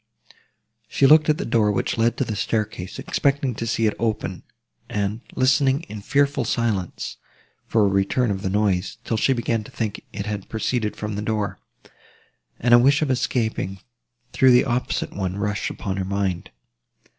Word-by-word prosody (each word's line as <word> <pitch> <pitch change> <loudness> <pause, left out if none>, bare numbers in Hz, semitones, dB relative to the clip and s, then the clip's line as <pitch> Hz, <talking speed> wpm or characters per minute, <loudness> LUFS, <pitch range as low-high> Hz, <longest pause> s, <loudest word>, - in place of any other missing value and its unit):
She 135 - +2
looked 155 +3 +6
at 155 - +3
the 200 - -3
door, 105 -3 +2
which 100 - -1
led 115 +1 +1
to - - +1
the 110 - -3
staircase, 105 -3 -2
expecting 140 -2 0
to 115 +1 -4
see 115 0 +1
it 105 - +2
open, 110 -5 -2 0.5
and 105 +2 -2
listening, 135 +2 +3
in 110 -11 -9
fearful 140 +3 +1
silence, 110 -6 -2 0.5
for 110 -2 +3
a - - +4
return 100 +5 +1
of 95 -1 -3
the 95 - -2
noise, 100 -1 0
till 115 - -2
she 110 - +2
began 120 -3 0
to - - -12
think 110 -3 -4
it 100 -1 -5
had 105 -2 -5
proceeded 110 -1 -1
from 105 0 -4
this 105 +1 -4
door, 105 -2 -2 1.0
and 120 0 +3
a 120 - +9
wish 140 +5 +4
of 140 - 0
escaping 110 -6 -1 0.5
through 130 -2 +5
the 125 - +5
opposite 125 -1 -1
one 95 -1 -3
rushed 105 0 -1
upon 95 -1 -4
her 95 - -1
mind. 95 -2 -2
110 Hz, 175 wpm, -23 LUFS, 100-125 Hz, 1.0 s, a